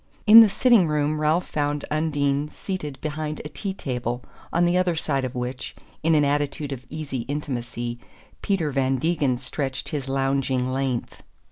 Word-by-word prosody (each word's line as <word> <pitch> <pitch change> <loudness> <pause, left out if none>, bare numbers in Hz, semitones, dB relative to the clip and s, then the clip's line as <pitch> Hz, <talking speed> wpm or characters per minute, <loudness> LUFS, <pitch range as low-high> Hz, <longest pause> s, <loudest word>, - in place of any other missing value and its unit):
In 220 +1 +11
the 225 -2 +8
sitting 220 -3 +4
room 150 0 0
Ralph 155 +4 +2
found 145 -1 -1
Undine 145 -2 0
seated 150 -9 -5
behind 155 0 -3
a - - -5
tea 170 +7 -4
table 125 -8 -3 0.3
on 170 +1 +3
the 175 +1 +2
other 180 -2 +2
side 140 -4 -1
of 130 -1 -4
which, 125 +1 -4 0.3
in 165 0 +3
an 150 -1 +4
attitude 145 0 -1
of 130 -1 -7
easy 145 -5 -4
intimacy, 120 -4 -4 0.4
Peter 175 -7 0
Van 135 -1 +1
Degen 140 -2 +1
stretched 135 +1 -3
his 140 -4 -4
lounging 135 -1 0
length. 130 -3 -2
145 Hz, 160 wpm, -24 LUFS, 135-155 Hz, 0.4 s, In